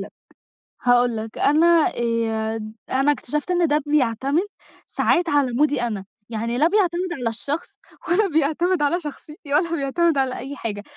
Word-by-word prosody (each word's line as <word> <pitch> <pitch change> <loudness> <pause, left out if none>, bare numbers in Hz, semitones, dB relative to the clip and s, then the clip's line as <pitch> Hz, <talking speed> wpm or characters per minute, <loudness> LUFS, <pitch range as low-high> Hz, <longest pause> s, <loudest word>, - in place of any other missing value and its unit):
لك، - - -10 0.7
هاقول 245 -1 +3
لك 220 0 -7
أنا 325 +2 +4
آآ 225 -2 -2 0.2
أنا 270 +3 +3
اكتشفت 295 +4 -3
إن 350 -1 +2
ده 300 0 +1
بيعتمد 275 +1 +1 0.5
ساعات 345 -1 +1
على 285 -3 +2
مودي 290 +1 +2
أنا، 215 -5 -3 0.2
يعني 230 +1 -3
لا 300 +5 +4
بيعتمد 360 -2 0
على 245 -7 -2
الشخص، 285 +8 -4 0.3
ولا 380 +4 +3
بيعتمد 320 +2 +1
على 295 +5 +2
شخصيتي 300 0 -8
ولا 330 +3 +2
بيعتمد 320 +2 +1
على 265 -1 0
أي 275 +3 -6
حاجة 210 -5 -4
285 Hz, 155 wpm, -22 LUFS, 240-330 Hz, 0.7 s, أنا